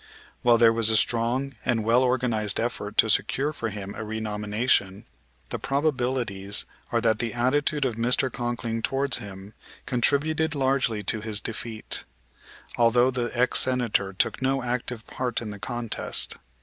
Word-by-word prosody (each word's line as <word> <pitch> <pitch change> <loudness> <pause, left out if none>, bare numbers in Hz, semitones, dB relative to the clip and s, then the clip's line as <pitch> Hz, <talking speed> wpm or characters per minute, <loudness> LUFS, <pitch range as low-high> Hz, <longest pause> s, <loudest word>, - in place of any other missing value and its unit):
While 120 -1 +5
there 115 -1 +5
was 115 -1 +5
a 110 - +4
strong 125 +5 0
and 115 -3 0
well 115 +3 +3
organized 120 -5 +1
effort 110 -3 -3
to - - +6
secure 135 +7 +1
for 115 -5 -2
him 100 -1 -7
a 110 - -6
renomination, 105 -1 -1 0.4
the - - -4
probabilities 125 -8 0 0.3
are 115 -1 +1
that 110 -2 +2
the 120 0 -3
attitude 145 +4 +1
of 120 -4 -2
Mr. 125 +2 +1
Conkling 120 -1 -3
towards 135 +2 +1
him 100 -2 -9 0.3
contributed 155 +5 +1
largely 130 -6 0
to 110 +2 -1
his 105 -1 +1
defeat; 110 0 -4 0.7
although 120 +2 +4
the 120 -2 -2
ex 125 +1 +3
Senator 120 -6 +1
took 95 - -1
no 135 0 0
active 120 -2 -3
part 125 -2 -2
in 110 -3 -6
the 100 - -9
contest. 120 +1 0
120 Hz, 150 wpm, -25 LUFS, 110-130 Hz, 0.7 s, to